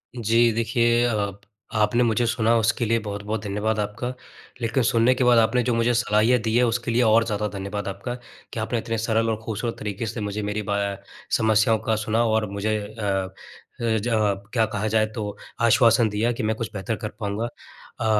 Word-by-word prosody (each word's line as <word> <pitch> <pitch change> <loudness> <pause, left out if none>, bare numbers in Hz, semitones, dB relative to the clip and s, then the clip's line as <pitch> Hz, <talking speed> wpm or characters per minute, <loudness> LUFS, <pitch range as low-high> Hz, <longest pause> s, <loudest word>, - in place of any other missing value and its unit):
जी, 115 0 +3
देखिए 120 +1 +2
अ, 105 -4 0 0.5
आपने 105 +3 +3
मुझे 120 +1 +2
सुना 115 -1 +2
उसके 115 +2 +1
लिए 115 +1 +2
बहुत-बहुत 105 0 -4
धन्यवाद 105 +2 -1
आपका। 105 +4 -3 0.5
लेकिन 115 +3 +1
सुनने 115 +1 +3
के 130 - 0
बाद 125 -1 +5
आपने 125 +2 +3
जो 120 0 0
मुझे 115 +1 +2
सलाहियाँ 115 +1 +3
दी 110 0 -1
है 125 - +4
उसके 120 0 -1
लिए 120 +2 +2
और 115 0 +5
ज़्यादा 105 -1 -1
धन्यवाद 100 +1 -4
आपका, 100 +6 -4 0.4
कि - - -3
आपने 110 +2 -1
इतने 115 0 -3
सरल 115 0 +1
और 110 - 0
खूबसूरत 115 +1 -3
तरीके 105 +1 -4
से 110 0 -4
मुझे 105 +1 -3
मेरी 105 +1 -2
बा 100 - +1 0.2
अ, - - -9 0.4
समस्याओं 110 0 +3
का 110 0 0
सुना 110 +2 0
और 110 -2 +1
मुझे 105 +2 -1
अ 105 +2 -8
अ, 95 -2 -1 0.5
ज 115 0 0 0.4
क्या 115 -3 +3
कहा 105 0 -3
जाए 110 0 +2
तो 105 -3 -4 0.2
आश्वासन 115 -1 +5
दिया 105 +3 0
कि 120 - -4
मैं 110 +1 0
कुछ 115 +1 -5
बेहतर 105 +3 -3
कर - - -2
पाऊँगा। 105 +1 -2 0.5
अ, - - -2
110 Hz, 200 wpm, -24 LUFS, 105-115 Hz, 0.5 s, बाद